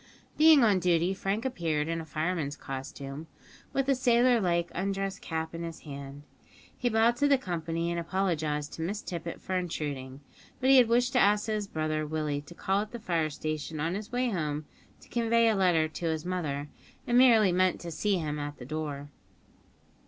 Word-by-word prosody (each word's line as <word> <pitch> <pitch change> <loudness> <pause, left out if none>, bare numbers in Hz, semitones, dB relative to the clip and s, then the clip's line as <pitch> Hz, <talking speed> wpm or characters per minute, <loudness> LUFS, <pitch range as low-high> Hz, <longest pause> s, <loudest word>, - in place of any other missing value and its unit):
Being 310 -3 +7
on 205 -4 +4
duty, 175 +1 +2
Frank 195 +4 -2
appeared 160 -11 -1
in 165 0 -2
fireman's 155 -2 -2
costume, 135 +2 -7 0.4
with 270 - 0
the 275 - +3
sailor 245 -1 +3
like 170 -2 0
undress 195 +1 -2
cap 160 0 -4
in 165 - -5
his 165 -1 -6
hand. 140 -1 -8 0.5
He 245 - 0
bowed 230 +1 +3
to 285 - +3
the 280 -1 +5
company, 170 -5 -3
and 170 - -1
apologised 160 -5 -1
to - - -6
Miss 200 +6 -3
Tippet 170 -1 -5
for 185 - -4
intruding, 145 -6 -4 0.4
but 260 +1 +3
he 270 - +8
had 250 -3 +7
wished 245 +2 +2
to 250 - +4
ask 205 0 +4
his 215 -2 -2
brother 155 -2 -2
Willie 150 -2 -2
to 150 +4 -14
call 195 +3 0
at 210 - -5
the 235 - -5
fire 170 -7 0
station 155 +1 -4
on 165 +3 -1
his 210 +3 -5
way 250 0 0
home 155 -5 -2 0.4
to - - -17
convey 230 -1 +2
a 220 - +3
letter 175 -5 +3
to 160 +2 -6
his 160 -1 -2
mother, 150 -6 -3 0.4
and 240 - 0
merely 230 -6 +6
meant 185 +1 +2
to 170 - -6
see 200 +4 0
him 150 -3 -3
at 145 0 -5
the 125 - -9
door. 145 0 -5
170 Hz, 190 wpm, -29 LUFS, 155-215 Hz, 0.5 s, he